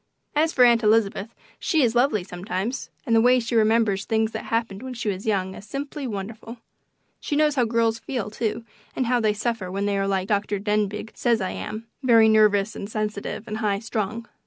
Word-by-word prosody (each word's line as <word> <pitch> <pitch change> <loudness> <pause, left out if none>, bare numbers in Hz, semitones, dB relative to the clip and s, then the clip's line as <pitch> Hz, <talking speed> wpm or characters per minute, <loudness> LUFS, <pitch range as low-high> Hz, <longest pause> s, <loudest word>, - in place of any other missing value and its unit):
As 315 +2 +3
for 250 -5 +5
Aunt 235 -1 +5
Elizabeth, 215 -1 +2 0.3
she 315 -4 +2
is 230 -2 +2
lovely 240 -5 +2
sometimes, 195 +6 -4 0.2
and 230 - +2
the 225 - +6
way 250 +2 +5
she 235 0 -4
remembers 220 -3 +3
things 220 0 +1
that - - -5
happened 225 -3 -2
when 260 -1 -6
she 225 -2 -2
was 195 +2 -4
young 190 -3 0
is - - -10
simply 280 +3 -5
wonderful. 220 +2 -6 0.6
She 295 - -3
knows 300 0 +3
how 255 -4 +2
girls 230 0 +1
feel, 230 -5 -4
too, 230 +1 -3 0.3
and 255 - 0
how 245 +1 +2
they 215 -2 +2
suffer 215 -3 -2
when 195 +2 -2
they 200 -1 0
are 195 - 0
like 190 -1 0
Dr. 205 0 0
Denbigh 210 +1 -1
says 235 -2 +1
I 190 -2 -2
am 215 +1 -6 0.2
very 230 -4 +6
nervous 210 -1 +4
and 200 - -6
sensitive 215 0 -4
and 215 0 -4
high 210 -3 0
strung. 225 +1 -3
220 Hz, 205 wpm, -24 LUFS, 205-235 Hz, 0.6 s, the